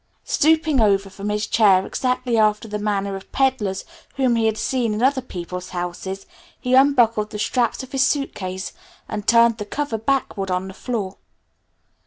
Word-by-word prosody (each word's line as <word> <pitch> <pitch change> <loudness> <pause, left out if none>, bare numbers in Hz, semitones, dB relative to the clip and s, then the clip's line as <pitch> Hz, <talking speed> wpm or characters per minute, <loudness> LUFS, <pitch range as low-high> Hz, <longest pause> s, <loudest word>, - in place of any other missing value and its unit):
Stooping 310 -3 +3
over 195 -2 +2
from 195 +2 -5
his 210 +1 -1
chair 195 -4 +4
exactly 250 -1 -1
after 215 0 +2
the 210 0 -4
manner 200 -1 -1
of 195 - -10
peddlers 255 -8 0 0.3
whom 260 -4 +2
he 225 -1 +2
had 220 -1 0
seen 235 -4 0
in 220 - -2
other 265 0 +3
people's 180 -5 -7
houses, 180 +2 -5 0.3
he 250 - -2
unbuckled 240 -6 +4
the 215 - -6
straps 240 +4 0
of 260 - -11
his 270 - 0
suitcase, 190 -10 -2 0.3
and 210 -1 -5
turned 230 -1 +5
the - - -2
cover 240 +1 -3
backward 225 -5 -1
on 185 +1 -1
the 190 - -8
floor. 200 -3 -4
215 Hz, 170 wpm, -22 LUFS, 195-255 Hz, 0.3 s, turned